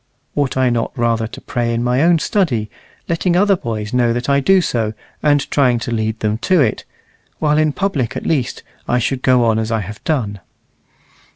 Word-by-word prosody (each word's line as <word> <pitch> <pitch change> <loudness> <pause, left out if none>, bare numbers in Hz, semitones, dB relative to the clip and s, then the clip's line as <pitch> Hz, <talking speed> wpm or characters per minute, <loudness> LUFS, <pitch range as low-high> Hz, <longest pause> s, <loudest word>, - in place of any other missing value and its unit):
Ought 140 -3 0
I 130 -1 +3
not 115 -1 -1
rather 115 -1 +1
to - - -10
pray 120 -1 -2
in 115 0 -1
my 125 +2 +1
own 170 +1 +4
study, 140 - 0 0.4
letting 170 +1 0
other 200 +2 +4
boys 110 - -5
know 120 -2 +2
that 120 +3 -3
I 140 0 +4
do 190 +7 +4
so, 115 -10 -1 0.3
and 145 -1 +2
trying 125 -4 +3
to 120 +1 -4
lead 110 -1 -2
them 105 +1 0
to 185 +6 +2
it, 125 -7 +1 0.5
while 150 0 +2
in 155 -1 +2
public 145 - -2
at - - -6
least 130 -6 -1 0.2
I 125 - +2
should 125 +2 -1
go 125 -2 +3
on 110 -1 +2
as 110 0 -2
I 110 -1 0
have 105 +3 -9
done?" 110 -10 -1
125 Hz, 200 wpm, -18 LUFS, 115-150 Hz, 0.5 s, own